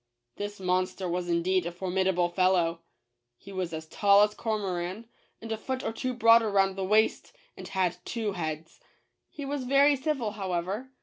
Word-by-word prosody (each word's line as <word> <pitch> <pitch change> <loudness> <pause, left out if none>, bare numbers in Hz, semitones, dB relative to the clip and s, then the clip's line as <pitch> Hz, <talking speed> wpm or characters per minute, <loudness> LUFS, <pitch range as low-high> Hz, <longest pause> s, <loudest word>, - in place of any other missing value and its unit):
This 205 0 -5
monster 185 0 -1
was 175 0 -2
indeed 170 +1 +1
a - - -3
formidable 185 0 0
fellow. 175 -2 +1 0.6
He 200 - -13
was 185 -3 -3
as 160 -1 -6
tall 200 +4 +4
as 210 0 +1
Cormoran, 200 -1 -3 0.3
and 225 0 -8
a 220 - -1
foot 260 +2 -4
or - - -2
two 255 +2 -3
broader 230 -1 +5
round 195 -1 +2
the 195 - -3
waist, 215 - +1 0.2
and - - -9
had 180 -2 0
two 225 -3 -3
heads. 160 -3 -5 0.5
He 285 - -7
was 275 -2 -3
very 280 +2 +5
civil, 270 -5 -2
however. 195 +4 -3
195 Hz, 170 wpm, -28 LUFS, 180-225 Hz, 0.6 s, broader